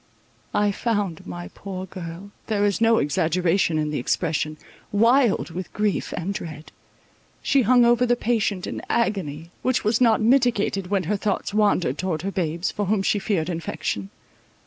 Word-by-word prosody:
I 205 0 +3
found 205 -6 -2
my 90 -1 -6
poor 190 - -7
girl, 185 +1 -8 0.2
there 205 -2 +1
is 205 +1 0
no 225 0 +5
exaggeration 170 +2 +1
in 150 -1 -1
the 150 - -1
expression, 155 +3 -1 0.3
wild 230 -2 +3
with 180 +3 -6
grief 210 -1 -1
and 180 +3 -2
dread. 160 -4 -7 0.7
She 275 - +3
hung 245 +1 +5
over 240 +1 +4
the 245 - +3
patient 215 -5 0
in - - -5
agony, 170 -8 -1
which 255 0 +1
was 220 +3 +1
not 230 -3 +5
mitigated 225 -5 +2
when 195 -1 0
her 205 +5 -1
thoughts 200 0 -2
wandered 200 -9 +2
towards 175 -3 -2
her 195 - -2
babes, 170 -1 -1
for 205 -2 -3
whom 200 -1 +1
she 205 - +2
feared 190 -6 -1
infection. 160 - -3
195 Hz, 165 wpm, -24 LUFS, 165-215 Hz, 0.7 s, no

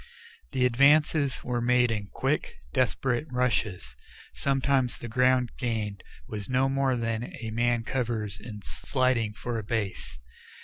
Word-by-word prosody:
The 125 - +2
advances 140 +2 +4
were 120 -1 -1
made 125 0 +3
in 105 -2 -2
quick, - - -1 0.2
desperate 130 +3 +1
rushes 110 - -1 0.4
sometimes 135 -2 +1
the 120 - -7
ground 125 +1 +3
gained 110 -5 -2 0.3
was 105 -2 -5
no 130 +1 +3
more 135 -1 +1
than 115 0 -2
a 110 -1 -5
man 120 +1 +1
covers 115 -4 -2
in 105 -3 -9
sliding 130 -5 0
for 115 +1 -3
a - - -6
base. 105 -2 -3
120 Hz, 135 wpm, -28 LUFS, 110-130 Hz, 0.4 s, advances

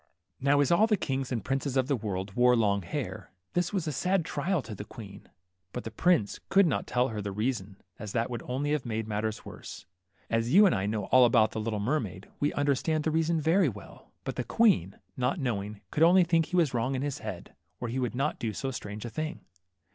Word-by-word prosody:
Now 140 +1 +3
as 140 - +2
all 205 +6 +5
the 215 -2 +2
kings 135 -5 -2
and 115 -5 -2
princes 135 0 -1
of 130 - +3
the 140 - +2
world 100 -4 -4
wore 125 +2 +5
long 100 -3 +2
hair, 85 - -5 0.2
this 175 -1 0
was 190 -5 -1
a 155 - -1
sad 180 +4 +1
trial 160 +1 -1
to 110 - -7
the 105 - -6
queen, 100 -2 -11 0.4
but 125 - -4
the 115 - -6
prince 135 - +2
could 195 0 +5
not 155 - 0
tell 125 +1 +1
her 110 -2 -4
the 100 0 -4
reason, 105 -2 -2 0.2
as 105 -3 -6
that 115 +1 0
would 120 -1 -4
only 140 +4 -1
have 150 -3 0
made 110 -1 -3
the - - -11
matter 110 +1 0
worse. 95 - -9 0.4
As 115 +1 0
you 210 +2 +9
and 190 - +4
I 95 +1 0
know 105 0 -1
all 130 0 +7
about 115 -2 +4
the 110 - -3
little 110 -1 -2
mermaid, 100 - -2
we 145 - +1
understand 145 +2 +1
the 160 - 0
reason 165 +1 +1
very 165 +2 +3
well; 100 -6 -12
but - - -5
the - - 0
queen, 185 - +3 0.2
not 125 +6 0
knowing, 105 -6 -3
could 150 - -2
only 180 +3 +7
think 165 -2 +2
he - - -4
was 165 -7 +3
wrong 125 +3 0
in 130 - -2
his 145 -2 -3
head, - - -7 0.3
or 120 - -3
he 120 +3 -2
would 125 -2 -2
not 140 +4 -1
do 110 -2 -2
so 135 +5 -3
strange 105 -2 -6
a - - -4
thing. 155 +3 -4
125 Hz, 235 wpm, -29 LUFS, 110-155 Hz, 0.4 s, you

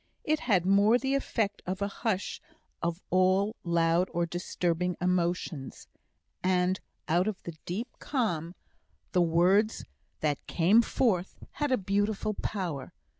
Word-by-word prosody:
It 310 0 +1
had 190 -8 +2
more 200 +4 +5
the 265 +2 -1
effect 220 -7 -1
of 185 +1 -2
a 200 - 0
hush 205 -1 -2 0.4
of 170 +1 -2
all 185 +4 +3
loud 170 +1 +2
or 170 0 0
disturbing 175 0 -1
emotions, 175 -5 -1 0.5
and 185 0 +2 0.3
out 175 +5 +2
of 215 -3 -3
the 170 - -6
deep 210 +8 -2
calm 175 - -1 0.6
the 180 - +3
words 180 +6 +3 0.4
that 150 -3 0
came 190 +7 +5
forth 200 -6 0 0.2
had 295 -2 -2
a 255 - +4
beautiful 205 +2 0
power. 175 -10 -4
185 Hz, 130 wpm, -29 LUFS, 175-210 Hz, 0.6 s, more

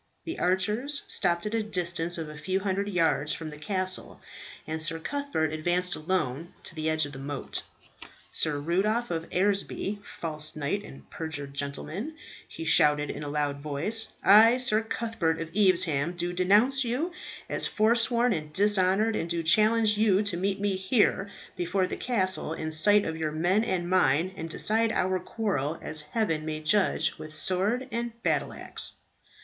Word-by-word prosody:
The 330 - -5
archers 210 +11 0
stopped 170 +1 +1
at 210 - -3
a 225 - +1
distance 175 -5 0
of 160 -2 -4
a 150 - -9
few 185 +6 -2
hundred 200 0 -1
yards 160 -6 +1
from 160 -1 -6
the 150 - -10
castle, 185 +1 -2 0.5
and 160 0 -4
Sir 160 +1 +2
Cuthbert 210 - -2
advanced 175 +3 0
alone 165 -2 -2
to - - -8
the 160 -1 -2
edge 160 -1 +1
of 145 - -8
the 135 - -9
moat. 140 0 -5 0.7
"Sir 150 -2 0
Rudolph 195 +9 0
of 165 -1 -4
Eresby, 200 +1 -1
false 155 -5 -3
knight 155 +7 -2
and 135 - -13
perjured 145 -4 -6
gentleman," 155 - -4 0.3
he 165 - -8
shouted 150 -2 +4
in - - -7
a 145 - -5
loud 145 -1 -2
voice, 155 +10 +1
"I, 220 +5 +7
Sir 225 -4 +3
Cuthbert 225 -8 -2
of 165 0 -6
Evesham, 175 -6 +2
do 175 0 -3
denounce 210 +10 +3
you 255 +9 -2 0.4
as - - +2
foresworn 235 +2 +2
and 155 -4 -5
dishonoured, 205 +3 +2
and 170 - -3
do 170 -1 -1
challenge 215 +4 +4
you 210 -2 +3
to 205 -4 -1
meet 195 +2 -1
me 200 -2 0
here 195 0 +1 0.3
before 180 +2 0
the - - -4
castle 185 -9 0
in 160 -1 -4
sight 205 +6 +4
of 160 0 -4
your 155 -1 -2
men 175 +7 +1
and 185 -6 -2
mine, 175 0 +2
and 165 -2 -6
decide 220 +6 +2
our 185 0 0
quarrel 170 -9 -2
as 155 -1 +1
heaven 155 0 -1
may 155 0 -4
judge 160 -1 +1
with 155 0 -8
sword 200 +10 0
and 235 0 -3
battle - - 0
axe." - - -6
180 Hz, 170 wpm, -27 LUFS, 155-210 Hz, 0.7 s, I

